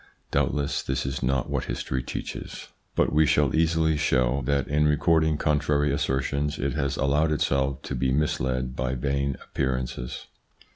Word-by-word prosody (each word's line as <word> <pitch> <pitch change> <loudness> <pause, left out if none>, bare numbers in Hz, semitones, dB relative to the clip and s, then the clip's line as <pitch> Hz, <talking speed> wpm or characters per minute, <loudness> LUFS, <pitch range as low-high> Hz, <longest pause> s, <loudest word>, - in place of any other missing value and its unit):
Doubtless 70 -1 0
this 65 0 -2
is 65 0 -3
not 65 0 0
what - - -2
history 65 +1 -3
teaches, 60 - -6 0.3
but - - +2
we 80 +1 +5
xx - - 0
INTRODUCTION - - +4 0.2
shall - - -1
easily 80 -1 +2
show 65 -1 +2
that 70 -1 +1
in 75 +1 +2
recording 80 +1 +3
contrary 75 -1 +1
assertions 70 +1 -1
it 70 0 -1
has 70 +1 -1
allowed 75 +3 +2
itself 70 -2 0
to - - -5
be 65 0 0
misled 65 -3 0
by 65 0 -1
vain 70 +1 -1
appearances. 65 -1 -3
70 Hz, 160 wpm, -26 LUFS, 65-75 Hz, 0.3 s, we